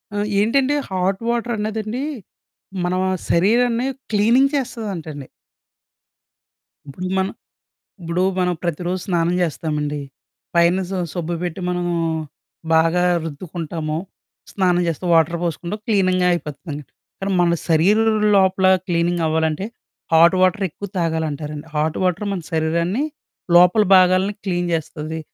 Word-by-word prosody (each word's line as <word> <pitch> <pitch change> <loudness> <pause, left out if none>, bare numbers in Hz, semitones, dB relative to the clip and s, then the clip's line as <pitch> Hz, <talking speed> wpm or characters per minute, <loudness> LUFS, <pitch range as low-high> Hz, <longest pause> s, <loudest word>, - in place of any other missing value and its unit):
ఆ! - - -1 0.2
ఏంటంటే, 265 +7 +2
hot 190 +2 -1
water 235 0 0
అన్నదండి, 215 +4 -3 0.8
మన 180 - 0 0.4
శరీరాన్ని 235 +7 +2 0.2
క్లీనింగ్ 235 +7 +3
చేస్తదంటండి. 185 - -4 1.6
ఇప్పుడు 180 +7 -6
మనం 190 +1 0 0.7
ఇప్పుడు 170 +1 -1 0.2
మనం 180 -1 +1
ప్రతిరోజు 175 +2 -2
స్నానం 175 -1 +1
చేస్తామండి. 150 -3 -2 0.5
పైన 170 +2 +4
స - - -7 0.2
సబ్బు 175 -1 -3
బెట్టి 180 +1 -4
మనము 175 -1 -1 0.8
బాగా 165 +2 +3 0.2
రుద్దుకుంటాము, 160 0 -5 0.5
స్నానం 180 -2 +2
చేస్తే 165 +2 -3
వాటర్ 165 +1 +3
పోసుకుంటాం, 170 +5 -3
క్లీనింగ్‌గా 185 -4 +2
అయిపోతుందండి. 150 -3 -5 0.4
కానీ 195 0 -1
మన 175 - +3 0.2
శరీరం 200 +8 +4 0.3
లోపల 190 -1 +3 0.2
క్లీనింగ్ 175 -1 0
అవ్వాలంటే, 160 +3 0 0.5
హాట్ 170 +3 +6
వాటర్ 185 +2 +2
ఎక్కువ 200 +6 -8
తాగాలంటారండి. 155 -3 -2
హాట్ 155 +1 0
వాటర్ 185 +3 0
మన 190 - -2
శరీరాన్ని 170 - 0 0.5
లోపల 180 +5 +6
భాగాలను 185 +2 +4
క్లీన్ 175 -2 -1
జేస్తది. 160 0 -3
175 Hz, 110 wpm, -20 LUFS, 160-195 Hz, 1.6 s, హాట్